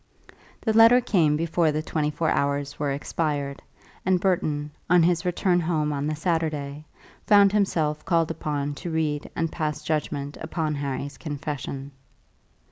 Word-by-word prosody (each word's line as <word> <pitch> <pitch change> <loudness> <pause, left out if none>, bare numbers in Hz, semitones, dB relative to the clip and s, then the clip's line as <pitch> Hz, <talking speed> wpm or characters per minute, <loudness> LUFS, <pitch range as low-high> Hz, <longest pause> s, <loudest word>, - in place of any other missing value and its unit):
The 220 - +1
letter 230 +2 +8
came 165 -11 +2
before 165 0 +1
the 155 +1 -2
twenty 155 -2 -1
four 160 +2 0
hours 140 0 -1
were 145 -1 0
expired, 145 -1 -2 0.4
and 185 0 +2
Burton, 155 -6 0 0.2
on 175 -1 +6
his 170 0 +2
return 180 0 +2
home 155 -3 0
on 140 +1 -2
the 155 - -1
Saturday, 155 -3 -2 0.4
found 200 -2 +6
himself 160 -7 0
called 165 -2 +1
upon 145 -2 -2
to 175 - -4
read 155 -2 -1
and 165 -1 -1
pass 155 -2 -3
judgment 145 -2 -2
upon 160 -1 -2
Harry's 140 -1 -4
confession. 145 -2 -5
155 Hz, 145 wpm, -25 LUFS, 145-170 Hz, 0.4 s, letter